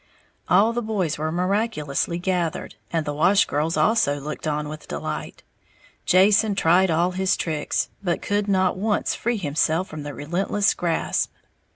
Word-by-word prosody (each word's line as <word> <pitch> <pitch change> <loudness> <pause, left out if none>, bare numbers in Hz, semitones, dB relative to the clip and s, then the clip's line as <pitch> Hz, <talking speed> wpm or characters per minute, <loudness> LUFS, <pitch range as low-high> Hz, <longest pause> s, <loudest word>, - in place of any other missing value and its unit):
All 205 +6 +4
the 240 - -1
boys 200 -9 -2
were 155 +1 -1
miraculously 175 -4 -1
gathered, 175 -2 -2 0.2
and 165 -2 -1
the 145 - -2
wash 175 +7 +4
girls 155 +3 -1
also 180 -11 +2
looked 150 +2 -6
on 150 0 -1
with 155 0 -9
delight. - - -5 0.6
Jason 200 +3 +4
tried 185 +1 +3
all 170 +3 +2
his 190 +1 0
tricks, 155 -3 -1
but 175 -4 -1
could 205 0 -1
not 190 -2 +2
once 210 +2 0
free 235 0 -1
himself 160 +1 0
from 155 - -7
the 145 -1 -7
relentless 185 +7 0
grasp. 170 -2 -1
175 Hz, 155 wpm, -23 LUFS, 155-200 Hz, 0.6 s, All